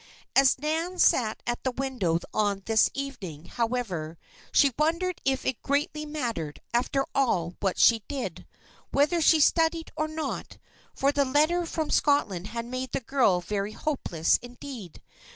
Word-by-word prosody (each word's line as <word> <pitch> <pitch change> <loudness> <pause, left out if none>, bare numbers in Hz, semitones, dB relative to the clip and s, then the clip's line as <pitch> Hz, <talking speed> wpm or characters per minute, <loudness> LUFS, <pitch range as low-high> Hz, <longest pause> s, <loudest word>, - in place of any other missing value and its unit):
As 270 -1 +5
Nan 320 +6 -2
sat 220 -10 +3
at 240 0 -3
the 260 - +1
window 250 -10 -1 0.2
on 205 -2 0
this 225 -1 +4
evening, 220 - -6
however, 210 -9 -3 0.3
she 280 -3 +4
wondered 335 +4 0
if 265 0 0
it 260 - -1
greatly 300 +2 -1
mattered, 235 - -3
after 270 +3 +1
all, 185 -11 +1
what 195 -2 -1
she 230 -2 +5
did 275 -2 -5 0.4
whether 300 +5 +2
she 320 0 +5
studied, 325 +2 +2
or 310 0 -1
not. 310 0 -5 0.4
For 275 +1 +2
the 285 0 +2
letter 310 +6 +2
from 315 -2 -3
Scotland 205 - +2
had 230 +1 -5
made 255 +1 -5
the - - +1
girl 235 -8 +2
very 200 +3 -3
hopeless, 215 - 0
indeed. 245 - -10
260 Hz, 150 wpm, -27 LUFS, 215-300 Hz, 0.4 s, As